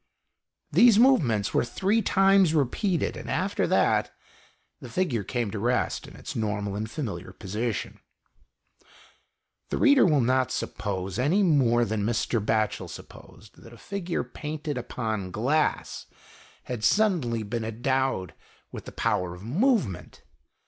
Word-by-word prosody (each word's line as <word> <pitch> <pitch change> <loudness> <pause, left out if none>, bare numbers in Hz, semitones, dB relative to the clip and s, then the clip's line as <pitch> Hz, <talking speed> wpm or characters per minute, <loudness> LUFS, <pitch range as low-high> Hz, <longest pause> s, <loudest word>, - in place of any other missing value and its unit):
These 235 -3 +6
movements 140 - +3
were - - +3
three 195 - 0
times 195 -5 +4
repeated,\ 160 - 0
and, - - -8
after - - 0
that, - - +2 0.7
the 125 - -10
figure 125 - -1
came 120 -1 -2
to 105 - -4
rest 120 +4 -1
in - - -13
its - - -8
normal 105 -2 -2
and 110 +1 -4
familiar 100 - -5
position. 105 +4 -4 1.7
The - - -2
reader 285 -2 +5
will 155 -5 +4
not 130 +1 +1
suppose, 95 -1 -4
any 165 +11 +2
more 125 -9 +3
than 110 -2 -2
Mr. 115 0 0
Batchel 110 0 0
supposed, 110 - -13
that 115 - -14
a - - -13
figure 185 - -3
painted 150 0 -5
upon 110 -5 -3
glass 135 +11 -1 0.6
had 120 -4 -6
suddenly 160 - +2
been 110 +2 -3
endowed 120 - -1 0.4
with - - -8
the - - -8
power 90 -1 -1
of 90 - -13
movement. 165 - 0
120 Hz, 135 wpm, -26 LUFS, 110-160 Hz, 1.7 s, These